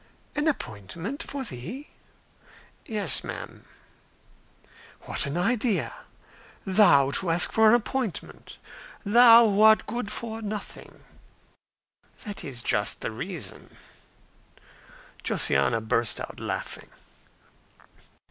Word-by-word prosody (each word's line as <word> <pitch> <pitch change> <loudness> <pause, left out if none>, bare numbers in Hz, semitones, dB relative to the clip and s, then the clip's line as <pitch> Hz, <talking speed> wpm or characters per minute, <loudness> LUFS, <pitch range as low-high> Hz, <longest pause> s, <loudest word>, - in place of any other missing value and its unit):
"An 295 +1 0
appointment? 170 - -4
for 280 -4 -5
thee!" 230 - -8 1.0
"Yes, 210 -3 +1
madam." - - -8 1.4
"What - - -1
an 140 +4 -3
idea! 200 - 0 0.7
thou 175 -9 +5
to 180 +4 +1
ask 165 +2 +2
for 220 -1 +5
an 225 - +6
appointment! 240 -3 -4 0.5
thou, 230 +2 +7
who 205 0 +1
art 220 0 +6
good 235 -2 -4
for 225 -1 -5
nothing." 210 -1 -8 1.2
"That's 140 - -6
just - - +1
the - - -3
reason." - - -6 1.5
Josiana 115 - +2
burst 110 +1 0
out - - -8
laughing. - - -5
210 Hz, 95 wpm, -26 LUFS, 165-235 Hz, 1.5 s, thou